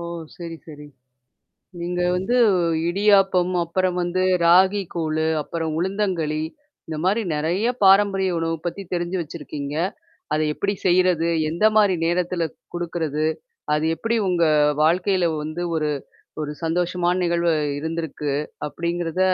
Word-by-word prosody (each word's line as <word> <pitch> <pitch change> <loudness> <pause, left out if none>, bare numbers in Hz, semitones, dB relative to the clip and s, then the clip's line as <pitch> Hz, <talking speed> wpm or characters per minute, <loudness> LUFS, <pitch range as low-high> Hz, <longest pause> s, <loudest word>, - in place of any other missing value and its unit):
ஓ! - - -5 0.3
சரி, 170 -1 -7
சரி. 150 -2 -10 1.0
நீங்க 180 +1 -2
வந்து 190 +7 0 0.5
இடியாப்பம், 195 -1 +3
அப்புறம் 185 +1 0
வந்து 175 +1 -1 0.2
ராகி 190 +4 +5
கூழு, 160 -1 -1
அப்புறம் 160 +1 -3
உளுந்தங்களி. 180 -5 -1 0.5
இந்தமாரி 180 +8 0
நெறைய 170 +9 0 0.2
பாரம்பரிய 195 -1 +4
உணவு 165 0 -1
பத்தி 185 +3 -3
தெரிஞ்சு 175 +1 -1
வச்சிருக்கீங்க. 150 -2 -6 0.6
அத 155 - +1
எப்பிடி 200 +4 -1
செய்யிறது, 180 -2 +3 0.2
எந்தமாரி 210 +2 +3
நேரத்தில 175 0 0 0.3
குடுக்குறது? 160 -3 -2 0.5
அது 150 +1 0
எப்பிடி 230 +4 -1
உங்க 175 -2 +2 0.4
வாழ்க்கையில 180 +2 +2 0.2
வந்து 155 +3 -5
ஒரு 155 -1 0 0.6
ஒரு 150 0 -4
சந்தோஷமான 175 +1 0
நிகழ்வா 170 -1 +1 0.3
இருந்திருக்கு 160 -2 -3 0.4
அப்பிடிங்கிறத 170 +2 -3
175 Hz, 110 wpm, -22 LUFS, 160-185 Hz, 1.0 s, ராகி